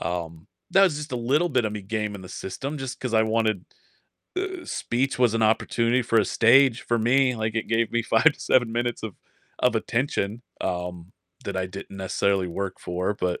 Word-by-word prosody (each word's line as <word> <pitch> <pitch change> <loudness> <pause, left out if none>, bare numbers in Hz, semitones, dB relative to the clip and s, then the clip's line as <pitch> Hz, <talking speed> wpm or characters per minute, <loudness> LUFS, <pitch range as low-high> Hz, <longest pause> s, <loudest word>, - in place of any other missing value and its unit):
um, 85 -1 -4 0.3
that 195 0 +7
was 160 -6 +2
just 150 0 -6
a 125 - 0
little 140 +9 +1
bit 125 -5 +1
of 105 - -1
me 105 -2 -5
gaming 105 -1 -3
the 90 - -10
system, 135 +10 -5
just 135 -1 -6
'cause 125 -3 -3
I 110 - +5
wanted 110 -4 0 0.8
uh, 375 -2 -6
speech 125 +2 -1
was 120 -3 +3
an 115 - +1
opportunity 115 +2 +2
for 115 0 +2
a 105 - +4
stage 125 +4 +5
for 120 -1 0
me, 125 +3 +3
like, 110 0 -2
it 110 - -2
gave 115 0 +1
me 120 0 +1
5 115 +3 +2
to 160 - +9
7 125 -5 +1
minutes 120 0 -1
of 110 -4 -5 0.4
of 125 -2 +2
attention, 115 -1 -1 0.2
um, 90 0 -4 0.3
that 100 -1 -4
I 95 - -1
didn't 100 +1 -9
necessarily 95 0 0
work 95 +2 -4
for, 90 +3 -2
but 90 -3 -2
115 Hz, 200 wpm, -25 LUFS, 100-125 Hz, 0.8 s, to